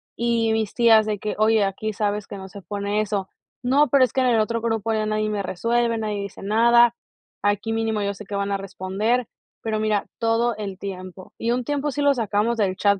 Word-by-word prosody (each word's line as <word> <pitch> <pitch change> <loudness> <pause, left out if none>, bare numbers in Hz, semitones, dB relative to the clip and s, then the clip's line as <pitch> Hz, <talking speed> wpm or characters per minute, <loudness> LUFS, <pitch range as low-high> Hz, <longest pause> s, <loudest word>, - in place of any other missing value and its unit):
Y 230 -1 +1
mis 220 -2 -1
tías 225 -3 +6
de 210 -2 -2
que: 210 - -3
"Oye, 215 -1 +4
aquí 210 +2 -2
sabes 205 0 -2
que 200 - -7
no 190 0 -9
se 200 +1 -10
pone 205 +3 -2
eso". 200 -2 -2 0.3
No, 280 +4 +4
pero 275 -2 +4
es 250 - +1
que 265 - +2
en 255 - +3
el 230 -2 +3
otro 230 +1 0
grupo 225 -1 -1
ya 215 0 0
nadie 215 0 0
me 205 -1 -1
resuelve, 230 +5 0
nadie 210 -2 -2
dice 200 -1 -8
nada, 235 +3 +5 0.5
aquí 205 +2 0
mínimo 225 -2 0
yo 200 0 -1
sé 210 +1 -11
que 205 - -5
van 200 0 -1
a 200 - +1
responder. 195 +5 -1 0.4
Pero 220 -1 -1
mira, 215 -2 0
todo 230 0 +1
el 195 -3 -6
tiempo. 185 -1 -8
Y 230 +1 -1
un 250 0 0
tiempo 290 +2 -1
sí 290 - -3
lo 285 -1 +4
sacamos 225 +1 0
del 190 -3 +1
chat 200 -1 +2
215 Hz, 225 wpm, -23 LUFS, 200-230 Hz, 0.5 s, tías